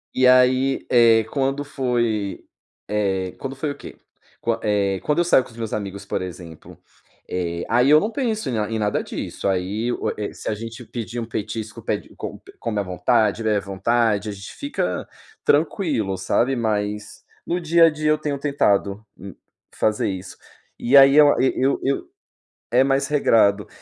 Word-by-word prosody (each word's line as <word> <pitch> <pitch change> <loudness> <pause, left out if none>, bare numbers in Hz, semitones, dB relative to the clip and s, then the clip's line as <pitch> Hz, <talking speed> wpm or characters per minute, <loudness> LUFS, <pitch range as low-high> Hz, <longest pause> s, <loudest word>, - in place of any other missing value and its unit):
E 130 - +3
aí, 130 +1 +4
eh, 115 -2 +5
quando 135 +1 -1
foi, 120 -7 -2 0.4
eh, 95 -3 -1
quando 135 0 -6
foi 145 +3 -3
o 145 - -4
quê? - - -11 0.5
Qua 115 0 -1
eh, 100 -2 +1
quando 150 +2 +1
eu - - +4
saio 170 -6 +4
com - - -15
os 115 - -16
meus 115 -2 -4
amigos, 100 -1 -5
por 95 - -2
exemplo, 85 -3 -10 0.5
eh, 85 -2 -3
aí 125 +5 +4
eu 150 - +8
não 210 - -1
penso 225 - -2
em - - -2
na 105 -2 -1
em 110 - -1
nada 105 -1 0
disso, - - -5
aí 100 +5 -1
o - - -2
e 105 -1 -4
se - - -6
a 110 - -1
gente 115 +3 -8
pedir 120 +1 -5
um 115 - -3
petisco 110 0 -5
pede - - -3
e - - -18
com - - -7 0.2
come 110 -3 -2
à - - 0
vontade, 105 +3 +1
bebe 110 -1 +2
à - - +1
vontade, 105 +2 0
a - - -3
gente 100 0 -9
fica 285 0 -3 0.4
tranquilo, 145 - +1
sabe, 120 +8 +1
mas 105 -2 -3 0.2
no 175 - -1
dia 170 0 +5
a - - +6
dia 155 0 -1
eu 155 - +3
tenho 150 -2 -3
tentado, 105 -7 0
hum, 95 +1 -9 0.4
fazer 105 -1 0
isso. 95 0 -6 0.4
E 130 +4 +4
aí 135 0 +8
eu 150 -1 +8
eu 130 +1 +3
eu 135 +1 +2
eu 135 +1 -1 0.6
é 125 +3 +4
mais 135 0 +1
regrado. 110 -8 +3
115 Hz, 185 wpm, -22 LUFS, 105-135 Hz, 0.6 s, eu